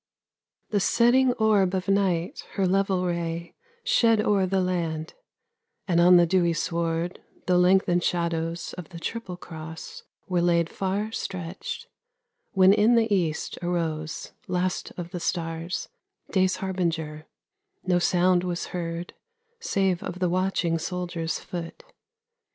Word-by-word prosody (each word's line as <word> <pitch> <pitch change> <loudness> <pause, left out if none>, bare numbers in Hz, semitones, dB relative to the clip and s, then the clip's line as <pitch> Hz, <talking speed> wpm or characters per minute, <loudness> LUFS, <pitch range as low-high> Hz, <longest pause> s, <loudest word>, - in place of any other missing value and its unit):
The 205 - +2
setting 245 +5 +4
orb 205 -5 +3
of 185 0 -2
night 190 -4 +1
her 195 - +1
level 190 0 +1
ray 170 -1 -3 0.3
Shed 235 - +4
o'er 205 -3 +2
the 190 +1 +1
land; 170 -4 -2 0.7
and 170 -2 +3
on 180 +1 +8
the 175 - +6
dewy 170 -1 +2
sward 165 +1 -2 0.2
The 180 -1 +3
lengthened 180 -1 +4
shadows 170 -1 -1
of 175 - -8
the 170 -3 -9
triple 190 -1 -5
cross 160 -1 -9 0.3
Were 180 -2 +1
laid 170 -1 +2
far 200 +3 -2
stretched, 185 -4 -5 0.4
— - - -52
when 190 0 +6
in 215 +3 +4
the 225 -2 +3
east 165 -5 -1
arose, 160 -3 -2 0.2
Last 180 0 -1
of 175 -1 -6
the 180 - -4
stars, 165 0 -3 0.4
day's 185 -1 +3
harbinger: 165 -5 -2 0.6
no 180 -1 +2
sound 180 0 +3
Was 180 -1 -2
heard, 170 0 -4 0.5
save 190 - 0
of 180 - -5
the 180 -1 +1
watching 180 -2 +1
soldier's 175 -2 -3
foot. 170 - -7
180 Hz, 135 wpm, -26 LUFS, 170-190 Hz, 0.7 s, on